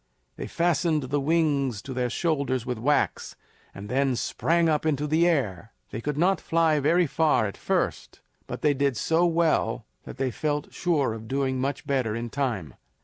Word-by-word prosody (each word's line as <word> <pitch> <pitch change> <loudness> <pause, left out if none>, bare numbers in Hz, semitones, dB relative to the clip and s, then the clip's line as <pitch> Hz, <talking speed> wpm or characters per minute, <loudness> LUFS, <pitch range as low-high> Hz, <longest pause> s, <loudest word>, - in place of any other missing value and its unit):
They - - -6
fastened 170 -2 +1
the 140 +3 -1
wings 140 -6 +1
to 135 - -6
their 125 -1 -1
shoulders 140 -5 -1
with 125 -3 -3
wax, 145 +6 0 0.4
and 100 +1 -9
then 130 +2 +1
sprang 170 +7 +1
up 155 -2 +1
into 150 -2 0
the 160 +3 +3
air. 115 - -1 0.2
They 110 - -5
could 145 +3 -3
not 180 +2 +2
fly 160 -2 +2
very 170 +5 +3
far 155 -5 +2
at 100 - -4
first, - - -2 0.3
but - - -7
they 150 - +4
did 140 -3 0
so 165 +8 +2
well 160 -9 +1 0.2
that - - -9
they 135 -1 -1
felt 150 +2 -3
sure 150 -9 0
of 110 0 -8
doing 130 0 -1
much 140 +1 -3
better 130 -6 0
in 115 0 -4
time. 115 - -2
140 Hz, 180 wpm, -26 LUFS, 125-160 Hz, 0.4 s, they